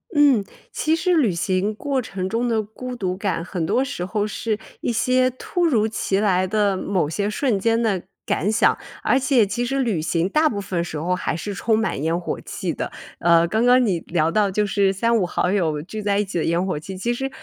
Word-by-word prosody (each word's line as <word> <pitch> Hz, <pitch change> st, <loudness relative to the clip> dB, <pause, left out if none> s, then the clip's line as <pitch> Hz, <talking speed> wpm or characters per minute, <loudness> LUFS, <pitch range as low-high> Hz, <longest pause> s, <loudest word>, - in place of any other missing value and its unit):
嗯， 280 Hz, -7 st, +5 dB, 0.3 s
其 315 Hz, +1 st, +1 dB
实 360 Hz, +2 st, +1 dB
旅 235 Hz, -, +3 dB
行 185 Hz, +4 st, 0 dB
过 270 Hz, +4 st, -1 dB
程 195 Hz, -5 st, -4 dB
中 230 Hz, +4 st, 0 dB
的 225 Hz, -2 st, +1 dB
孤 250 Hz, +4 st, -7 dB
独 185 Hz, -6 st, -2 dB
感 195 Hz, -4 st, -2 dB
很 175 Hz, -2 st, -3 dB
多 250 Hz, +10 st, +2 dB
时 180 Hz, -9 st, -4 dB
候 210 Hz, +2 st, -1 dB
是 215 Hz, 0 st, -2 dB, 0.2 s
一 -, -, 0 dB
些 255 Hz, +2 st, +2 dB
突 345 Hz, +7 st, -2 dB
如 230 Hz, -9 st, +3 dB
其 200 Hz, -3 st, -1 dB
来 185 Hz, -3 st, +2 dB
的 200 Hz, 0 st, +1 dB
某 185 Hz, -6 st, 0 dB
些 200 Hz, +5 st, -1 dB
瞬 225 Hz, 0 st, 0 dB
间 230 Hz, +3 st, +2 dB
的 200 Hz, -6 st, 0 dB, 0.2 s
感 205 Hz, -, 0 dB
想， 220 Hz, -, +3 dB, 0.2 s
而 -, -, +3 dB
且 265 Hz, -4 st, +3 dB
其 240 Hz, +5 st, -2 dB
实 270 Hz, +3 st, -1 dB
旅 220 Hz, -11 st, 0 dB
行 165 Hz, +3 st, 0 dB
大 310 Hz, +8 st, +3 dB
部 205 Hz, -5 st, -3 dB
分 180 Hz, -3 st, -2 dB
时 160 Hz, -2 st, -5 dB
候 180 Hz, +4 st, 0 dB
还 180 Hz, -, -2 dB
是 200 Hz, +5 st, -4 dB
充 220 Hz, +2 st, +1 dB
满 220 Hz, -10 st, -1 dB
烟 165 Hz, +2 st, 0 dB
火 175 Hz, -, -4 dB
气 -, -, -4 dB
的。 -, -, -4 dB, 0.3 s
呃， 170 Hz, 0 st, +4 dB
刚 220 Hz, +6 st, +1 dB
刚 250 Hz, +1 st, +6 dB
你 185 Hz, -6 st, +1 dB
聊 160 Hz, -2 st, 0 dB
到 205 Hz, +1 st, +2 dB
就 210 Hz, +2 st, +1 dB
是 195 Hz, -1 st, +2 dB
三 230 Hz, +4 st, +2 dB
五 195 Hz, -, +1 dB
好 180 Hz, +1 st, 0 dB
友 160 Hz, -7 st, 0 dB
聚 215 Hz, +7 st, -6 dB
在 200 Hz, 0 st, +1 dB
一 210 Hz, -, +1 dB
起 190 Hz, -, -4 dB
的 160 Hz, -, 0 dB
烟 170 Hz, +2 st, +1 dB
火 185 Hz, -6 st, -2 dB
气， 190 Hz, +5 st, -8 dB
其 235 Hz, +6 st, -1 dB
实， 270 Hz, +3 st, -3 dB
205 Hz, 250 characters per minute, -22 LUFS, 180-235 Hz, 0.3 s, 刚